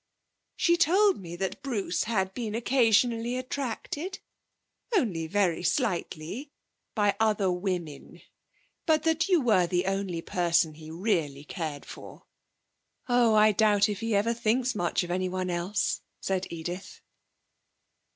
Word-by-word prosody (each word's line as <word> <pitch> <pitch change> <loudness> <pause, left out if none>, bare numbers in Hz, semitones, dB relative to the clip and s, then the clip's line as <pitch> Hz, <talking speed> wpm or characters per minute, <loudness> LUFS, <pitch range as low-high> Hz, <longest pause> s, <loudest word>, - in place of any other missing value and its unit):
'She 340 - +3
told 380 +4 +4
me 170 -1 -7
that 190 +8 -3
Bruce 215 -10 -1
had 190 -4 0
been 220 -2 -4
occasionally 235 0 +2
attracted 280 - -4 0.8
only 180 - 0
very 185 -2 +1
slightly 190 - -2 0.5
by 205 -3 +2
other 210 -4 +2
women, 180 -5 -4 0.7
but 310 -1 +3
that 325 +3 +1
you 360 -3 +5
were 215 - +3
the 180 +1 0
only 195 -3 -2
person 170 -4 +1
he 155 0 -11
really 165 -6 -1
cared 150 -2 -5
for.' - - -11 0.8
'Oh, 245 -3 +4
I 215 0 +6
doubt 205 0 +4
if 205 -2 -3
he 225 -1 -1
ever 220 +4 +2
thinks 235 +2 +1
much 175 -2 0
of 175 - -5
anyone 185 0 -1
else,' 175 +4 -1 0.2
said 190 -1 -2
Edith. 175 +3 -6
205 Hz, 130 wpm, -28 LUFS, 175-240 Hz, 0.8 s, I